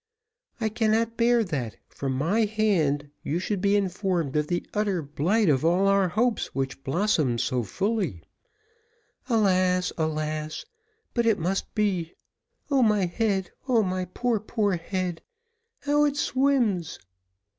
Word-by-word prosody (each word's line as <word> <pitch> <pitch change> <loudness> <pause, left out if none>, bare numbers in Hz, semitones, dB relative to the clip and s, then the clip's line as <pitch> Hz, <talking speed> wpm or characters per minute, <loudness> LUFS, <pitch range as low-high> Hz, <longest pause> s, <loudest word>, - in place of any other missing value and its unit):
I 220 -2 0
cannot 225 +1 +1
bear 235 0 +3
that, 135 - -4
from 135 -1 -4
my 170 +12 +1
hand, 170 -10 +1
you 155 - -2
should 185 +1 -2
be 200 0 +3
informed 185 -6 -1
of 150 0 +1
the 175 +2 -2
utter 205 -5 0
blight 175 +10 +1
of 140 -3 +3
all 180 +4 +3
our 195 -1 +4
hopes 230 +5 0
which 135 0 -3
blossomed 145 - +1
so 125 +1 0
fully. 175 - -2 1.1
Alas! 185 -5 +2
alas! 155 0 -2 0.5
but 235 -2 +1
it 220 -3 +4
must 185 +4 -2
be. 185 -6 0 0.6
O 275 -2 +4
my 210 -4 +3
head, 190 0 -1 0.2
my 190 -7 +1
poor, 230 +5 -1
poor 210 -2 0
head 180 0 -3 0.6
how 295 +1 +3
it 290 -1 0
swims! 255 - +1
190 Hz, 135 wpm, -26 LUFS, 160-220 Hz, 1.1 s, our